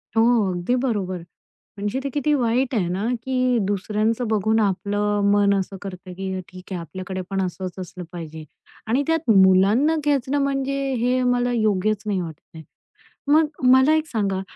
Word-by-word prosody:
हो. 225 -3 +3
अगदी 180 +7 -1
बरोबर. 210 -8 -1 0.6
म्हणजे 205 +6 -2
ते - - -1
किती 295 +1 +1
वाईट 250 0 +1
आहे 190 -6 +1
ना, 190 +5 -2 0.2
की 255 -1 +1
दुसऱ्यांचं 215 +4 -1
बघून 220 +1 +1
आपलं 205 +1 0
मन 200 -1 +4
असं 195 +1 -4
करतं, 185 -2 -8
की 190 0 -4
ठीक 185 +1 -11
आहे, 180 - -3
आपल्याकडे 185 +3 -6
पण 195 0 -1
असंच 185 0 -5
असलं 180 0 -7
पाहिजे. 160 -2 -8 0.4
आणि 245 +6 +1
त्यात 325 -5 0
मुलांना 195 +11 +5
खेचणं, 285 -1 +1
म्हणजे 275 0 -1 0.2
हे 250 +1 +1
मला 245 0 +1
योग्यच 215 -2 +1
नाही 200 -3 0
वाटत 160 -4 -7 0.2
आहे. 160 - -9 0.7
मग 315 +1 +5 0.3
मला 260 +4 +5
एक 315 0 0
सांगा, 200 -7 -1
210 Hz, 160 wpm, -22 LUFS, 190-250 Hz, 0.7 s, मुलांना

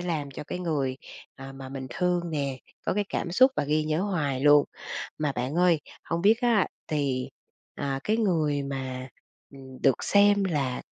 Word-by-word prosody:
làm 160 -5 -2
cho 150 - -7
cái 180 - -5
người, 145 -7 -1 0.4
à, 135 0 -9
mà 135 -1 -9
mình 135 -1 -6
thương 180 +6 +1
nè 140 -4 -2 0.3
có - - +1
cái 205 0 +1
cảm 170 - -2
xúc 260 +7 +6
và 145 - +1
ghi 155 +1 +1
nhớ 155 +2 0
hoài 150 -10 -1
luôn. 145 0 +6 0.5
Mà 150 -2 0
bạn 130 +4 -3
ơi, 175 -3 +4 0.2
hông 170 +1 -2
biết 220 +4 +5
á, 235 -5 +3 0.2
thì, 140 -5 -1 0.5
à, 135 -1 -2
cái 215 +1 +2
người 155 -9 +1
mà, 130 -1 -5 0.4
ừm, 130 -2 -12
được 135 -3 +3
xem 205 0 +5
là 140 -8 -1
150 Hz, 180 wpm, -27 LUFS, 135-180 Hz, 0.5 s, xúc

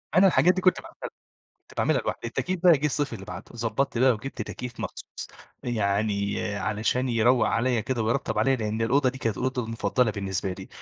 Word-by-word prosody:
أنا 190 +1 +7
الحاجات 180 0 +5
دي 185 - -2
كنت 185 -1 +3
ب - - -25 0.8
كنت - - -19
باعملها - - +2
لوحدي - - -4
التكييف 185 -1 -2
بقى 180 -2 +8
جه 150 - +1
الصيف 145 -2 -1
اللي 95 -3 -8
بعده، - - -7
ضبطت 115 +2 -1
بقى 130 0 +5
وجبت 115 +1 -5
تكييف 125 +2 -7
مخصوص - - -6 0.3
يعني 100 -3 0 0.2
علشان 110 +5 0
يروق 120 +1 +3
عليَّ 120 -1 +1
كده 120 0 -1
ويرطب 115 -1 0
عليَّ، 130 +5 +3
لأن 110 0 -2
الأوضة 130 +4 +3
دي 130 +1 -4
كانت 110 -6 -1
الأوضة 130 -1 -1
المفضلة 115 +1 +1
بالنسبة 95 -2 -2
لي، - - -9
120 Hz, 190 wpm, -26 LUFS, 110-130 Hz, 0.8 s, بقى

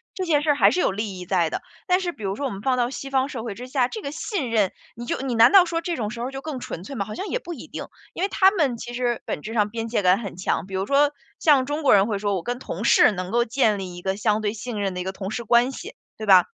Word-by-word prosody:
这 375 - -2
件 300 -4 +3
事 310 - -1
儿 290 - +2
还 - - +5
是 360 - 0
有 - - +2
利 200 -2 -4
益 180 - -7
在 175 -3 +1
的， - - -4 0.3
但 365 +1 +4
是 355 -2 -2
比 220 - -12
如 195 0 -1
说 285 - -3
我 265 - -2
们 195 0 -7
放 255 +1 +1
到 240 -1 +1
西 275 +1 -6
方 265 0 +1
社 235 -6 -5
会 225 - -4
之 250 +1 -8
下， 255 -2 +1
这 435 - -7
个 280 - -5
信 315 - -3
任， 210 -5 +2 0.2
你 240 +1 -7
就 - - -2
你 260 -3 -2
难 225 +1 +7
道 390 -2 +8
说 335 -1 -2
这 340 0 -2
种 215 -3 -2
时 235 +1 -6
候 255 +3 -3
就 270 0 -6
更 300 -4 -5
纯 170 - -6
粹 275 - -8
吗？ 200 -5 -2
好 215 - -7
像 390 - -4
也 - - -1
不 350 - -7
一 - - -10
定， - - -6 0.3
因 360 - -3
为 400 - +1
他 380 +1 +5
们 295 - 0
其 240 +1 -7
实 240 -1 -1
本 150 - -4
质 220 - -6
上 210 -2 +2
边 225 +1 -4
界 225 -2 +1
感 185 +1 +4
很 195 -5 -7
强。 175 -2 -1
比 195 - -11
如 190 +1 -1
说， 285 +1 +4 0.3
像 285 -5 +4
中 295 +3 -3
国 280 - +5
人 200 0 +5
会 210 -3 -1
说” 205 0 0
我 180 - -2
跟 245 0 -3
同 205 -5 -5
事 - - +6
能 185 -2 -4
够 235 0 +3
建 225 -3 +2
立 185 -2 -6
一 - - -8
个 190 +1 -1
相 215 0 +1
对 205 -1 -1
信 225 -1 -5
任 195 -2 -1
的 180 - -4
一 - - -3
个 190 - -3
同 195 0 -6
事 235 +2 -3
关 240 +4 +4
系“， 420 - -9 0.2
对 215 - -5
吧？ 185 -3 +7
235 Hz, 350 characters per minute, -24 LUFS, 200-280 Hz, 0.3 s, 道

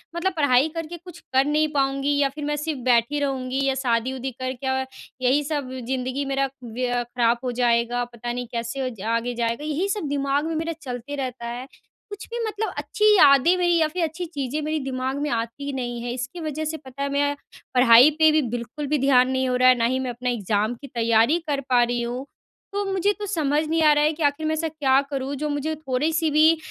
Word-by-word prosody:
मतलब 365 +2 0
पढ़ाई 285 0 +4
करके 330 +1 -5
कुछ 345 -1 -13
कर 265 +1 +4
नहीं 305 +1 +2
पाऊँगी 275 +1 +1
या 280 -1 +3
फिर 295 -1 -5
मैं 295 0 -1
सिर्फ़ 300 -2 -3
बैठी 245 +4 +3
रहूँगी 265 -1 -2
या 270 -1 +1
शादी-वादी 255 +2 -1
करके 255 +1 -4 0.6
यही 280 +4 +3
सब 285 -3 -3 0.2
ज़िंदगी 260 +1 -2
मेरा 275 0 0
व्य 245 +2 -3
अ, 245 0 0
ख़राब 240 -1 +1
हो 250 - -1
जाएगा। 240 0 +2
पता 240 0 -6
नहीं 245 -1 -4
कैसे 240 +3 -3
ज 210 -5 -12 0.2
आगे 245 +1 -3
जाएगा 235 +4 -1
यही 310 +6 -1
सब 400 -8 -2
दिमाग 280 +1 0
में 325 - -2
मेरा 325 +1 -2
चलते 255 +1 -6
रहता 255 -3 -4
है। 245 +3 -6 0.4
कुछ 410 - -7
भी 475 +1 -4
मतलब 435 0 -3
अच्छी 425 - -1
यादें 285 +3 +6
मेरी 350 -1 +2
या 315 -1 +3
फिर 345 +3 -2
अच्छी 330 +3 -3
चीज़ें 290 -2 -3
मेरे 310 +1 -1
दिमाग 260 +1 -2
में 295 - -1
आती 230 +4 -3
ही 285 - -3
नहीं 240 -2 -4
है, 240 - -3
इसकी 255 +7 -5
वजह 310 0 -3
से 320 +1 -3
पता 275 -1 -7
है 280 - -1
मैं 285 +1 +1 0.4
पढ़ाई 250 +2 +8
पे 315 -1 +6
भी 310 0 +3
बिल्कुल 245 +5 -5
भी 300 +1 +1
ध्यान 260 -1 +4
नहीं 260 0 0
हो 250 - +1
रहा 255 0 +5
है, 255 - +6
ना 230 - +1
ही 260 +2 +1
मैं 260 -1 -3
अपना 245 +1 -3
एग्ज़ाम 215 0 0
की 280 - -8
तैयारी 230 +5 +2
कर 280 -2 -1
पा 245 -1 +5
रही 240 0 -1
हूँ। 245 +3 -4 0.5
तो 405 0 -1
मुझे 385 +2 +1
तो 415 - -3
समझ 310 -6 0
नहीं 325 +1 +1
आ 305 - +7
रहा 295 - +2
है 305 +1 +2
कि 310 0 -4
आखिर 290 +2 +1
मैं 315 - +1
ऐसा 325 +1 -1
क्या 280 -4 +2
करूँ 270 0 -3
जो 300 +2 -3
मुझे 295 +2 -2
थोड़ी-सी 310 +3 0
भी 315 +2 +5
275 Hz, 225 wpm, -24 LUFS, 250-310 Hz, 0.6 s, पढ़ाई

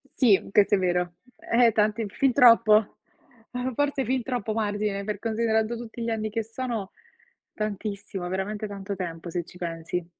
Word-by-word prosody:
sì, 215 -7 +4
questo 205 0 +5
è - - +1
vero. 180 -1 0 0.2
Eh, 235 0 +3
tanti 215 +1 +1
fin 270 +4 +1
troppo. 225 -3 +6 0.5
Uhm, 250 0 -3
forse 285 -1 +1
fin 255 +1 0
troppo 240 -4 -2
margine, 205 -2 -1
per 210 -1 -4
considerando 220 +1 0
tutti 235 0 -8
gli 230 - -1
anni 220 -1 -1
che 225 0 -1
sono; 225 -3 -4 0.6
tantissimo, 200 -3 -4
veramente 205 +3 -3
tanto 200 0 -5
tempo, 170 -2 -5
se 175 0 -2
ci 180 - -15
pensi. 165 0 -4
215 Hz, 160 wpm, -26 LUFS, 195-230 Hz, 0.6 s, troppo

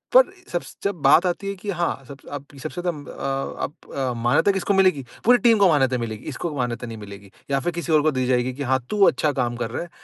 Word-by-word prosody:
पर - - +10 0.3
सब 175 - 0
स - - -13
जब 200 -5 -2
बात 175 - +6
आती 180 +2 -1
है 200 - -3
कि 200 +2 -8
हाँ 175 -2 0
सब 140 - -9
स - - -11
आप 145 -1 -5 0.2
सबसे 160 +3 -4
ज़्यादा 175 0 0 0.2
अ 135 0 -3
आप - - -3 0.2
अ, 130 -2 -1
मान्यता 120 +11 +3
किसको 195 +1 0
मिलेगी 185 -8 +3 0.2
पूरी 245 +2 +7
टीम 235 -2 +4
को 200 - +6
मान्यता 135 -5 +3
मिलेगी, 110 -3 -5
इसको 170 -3 -4
मान्यता 120 -1 -2
नहीं 115 -1 -7
मिलेगी 100 -2 -11 0.2
या 140 - +2
फ़िर 175 - -1
किसी 170 0 -3
और 155 - +6
को 155 - +3
दी 130 -2 -1
जाएगी 125 0 +1
कि 140 +3 -5
हाँ, 130 0 +2
तू 210 -1 +2
अच्छा 150 +3 +2
काम 120 -3 -1
कर 115 -1 -3
रहा - - -3
है। 175 - -11
140 Hz, 265 wpm, -23 LUFS, 125-180 Hz, 0.3 s, पर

